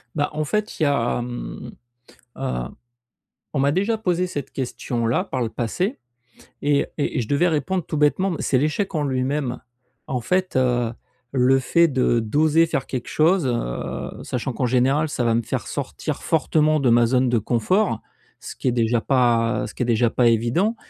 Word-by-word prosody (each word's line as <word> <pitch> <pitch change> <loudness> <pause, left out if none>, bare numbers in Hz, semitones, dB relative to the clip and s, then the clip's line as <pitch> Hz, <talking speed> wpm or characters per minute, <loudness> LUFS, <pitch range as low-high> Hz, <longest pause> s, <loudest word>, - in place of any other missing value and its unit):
Bah, 145 -2 0
en 155 0 -1
fait 210 +5 -2
il - - +1
y - - +4
a, 125 -4 +1
hem, 120 0 -6 0.7
heu, 135 0 -2 1.0
on 135 - +1
m'a 140 +1 +3
déjà 200 +6 +1
posé 180 -3 0
cette 145 -6 -5
question-là 120 +1 -1
par 130 -9 -4
le 115 - -1
passé 180 - -2 0.6
et 145 0 +2
et 145 - -1
et - - +2
je 110 - -5
devais 145 +5 +2
répondre 165 +3 -1
tout 155 - -3
bêtement 175 +6 +2
mais 165 - -4
c'est 130 - +2
l'échec 155 +8 0
en 150 - 0
lui-même. 130 -1 -1 0.5
En 125 -2 -1
fait, 185 +7 0
heu, 120 -2 +2 0.4
le 135 0 +3
fait 170 +6 +3
de 130 -4 +2
d'oser 155 +8 +3
faire 135 -4 -2
quelque 125 -3 -4
chose, 165 0 +3
heu, 115 - -3
sachant 125 +1 -3
qu'en 125 +2 -1
général, 135 +5 +2
ça 125 - -2
va 115 -1 +2
me 115 - +1
faire - - -3
sortir - - -4
fortement 155 -1 +2
de 130 - +2
ma 120 0 +5
zone 125 +1 +2
de 120 - +2
confort, 120 - +1 0.4
ce - - -9
qui - - -4
est 125 - +4
déjà 115 0 +1
pas, 120 -3 +2
heu, - - -3
ce - - -10
qui - - -1
est - - -1
déjà 120 0 +2
pas 120 0 +2
évident 120 - +2
135 Hz, 190 wpm, -22 LUFS, 120-155 Hz, 1.0 s, ma